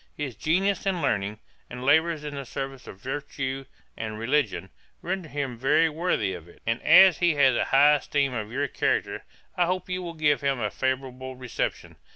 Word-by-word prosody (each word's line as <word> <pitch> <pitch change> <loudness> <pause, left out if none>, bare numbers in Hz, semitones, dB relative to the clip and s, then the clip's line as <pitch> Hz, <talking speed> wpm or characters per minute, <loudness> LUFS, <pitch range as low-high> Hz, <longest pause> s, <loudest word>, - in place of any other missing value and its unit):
'His 140 -6 -4
genius 195 +5 0
and 190 -2 +1
learning, 105 -8 -1 0.3
and 125 +1 -7
labours 160 +3 +3
in 150 -1 -5
the 140 -1 -5
service 135 0 -6
of 95 - -10
virtue 135 +1 -4 0.3
and 110 -1 -5
religion, 115 - -1 0.3
render 180 -2 -3
him 135 -4 -4
very 150 +5 +3
worthy 155 - -1
of 85 -2 -9
it; 85 - -18
and 115 +1 -1
as 190 -2 +7
he 175 -3 +3
has 135 -3 +4
a - - +1
high 145 +2 +5
esteem 140 -1 -1
of 110 -2 -4
your 140 +3 -1
character, - - -1 0.3
I 175 -1 +2
hope 185 0 -2
you 180 0 -2
will 170 -2 -6
give 150 -2 +2
him 140 -2 0
a 105 -3 -1
favourable 130 0 -3
reception. 125 -2 -4
140 Hz, 190 wpm, -26 LUFS, 125-160 Hz, 0.3 s, as